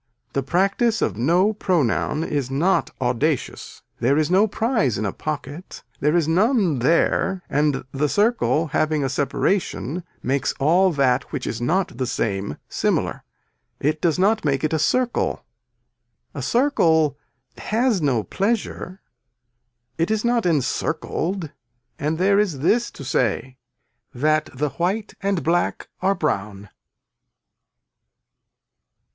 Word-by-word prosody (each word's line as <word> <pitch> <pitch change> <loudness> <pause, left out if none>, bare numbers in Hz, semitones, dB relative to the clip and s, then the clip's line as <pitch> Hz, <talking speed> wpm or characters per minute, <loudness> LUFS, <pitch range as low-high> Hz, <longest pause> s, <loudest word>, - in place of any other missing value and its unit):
The 135 - 0
practice 195 - +1
of - - -1
no 175 - +2
pronoun 160 - 0
is 140 -5 -2
not 165 +4 +1
audacious. 130 +3 -2 0.2
There 130 +5 +2
is 155 +2 +1
no 195 +4 +5
prize 220 - 0
in 105 - -2
a 100 - -2
pocket. 155 +3 -6 0.2
There 150 +4 +2
is 165 -3 +2
none 190 - +2
there 170 +6 +2
and 145 -1 +1
the 145 +2 0
circle 205 - +2
having 155 -1 +1
a 135 - 0
separation 160 +3 -1 0.2
makes 135 +2 0
all 175 +7 +4
that 130 -3 +1
which 140 -4 -4
is 115 - -4
not 165 0 0
the 130 - 0
same 100 -8 -2
similar, - - -1 0.6
it 155 +2 0
does 170 -2 +2
not 210 +4 +2
make 135 -3 0
it 155 - 0
a 160 - +1
circle. 250 +9 0 0.9
A - - -5
circle 165 - +2 0.4
has 225 -3 +1
no 130 -7 +1
pleasure, 195 - -2 1.0
it 165 - +1
is 220 +1 0
not 235 -4 +2
encircled 160 +3 -1 0.5
and 155 +2 -1
there 200 +3 +3
is 175 -10 0
this 235 +9 +2
to - - -11
say 125 0 -1 0.6
that 155 +4 +1
the 145 +3 -2
white 190 +8 -2
and 195 -2 0
black 175 +2 0
are 195 +2 +2
brown. 105 - -3
160 Hz, 130 wpm, -22 LUFS, 135-195 Hz, 1.0 s, no